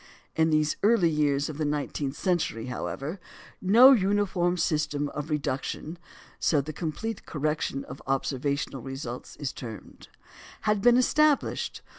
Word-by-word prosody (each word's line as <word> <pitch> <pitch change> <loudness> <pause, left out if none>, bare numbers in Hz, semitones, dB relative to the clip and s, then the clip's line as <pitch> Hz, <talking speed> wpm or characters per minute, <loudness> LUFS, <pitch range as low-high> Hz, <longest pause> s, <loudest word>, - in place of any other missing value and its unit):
In 160 0 +3
the 155 -1 +3 0.2
early 205 -6 +4
years 145 -2 +1
of 155 -1 -7
the - - 0
nineteenth 145 -1 -2
century, 175 - -1
however, 140 +7 -4 0.4
no 230 +8 +8
uniform 190 -5 +2
system 150 -3 0
of 150 +2 -6
"reduction" 150 +3 -3 0.4
(so 150 - +2
the 150 +3 -4
complete 185 +8 -4
correction 150 -2 -2
of - - -9
observational 135 0 -1
results 135 -1 -7
is 145 -3 -4
termed) 115 -4 -10 0.5
had 210 -2 +1
been 245 +2 +6
established. 300 +3 +2
155 Hz, 130 wpm, -27 LUFS, 140-190 Hz, 0.5 s, no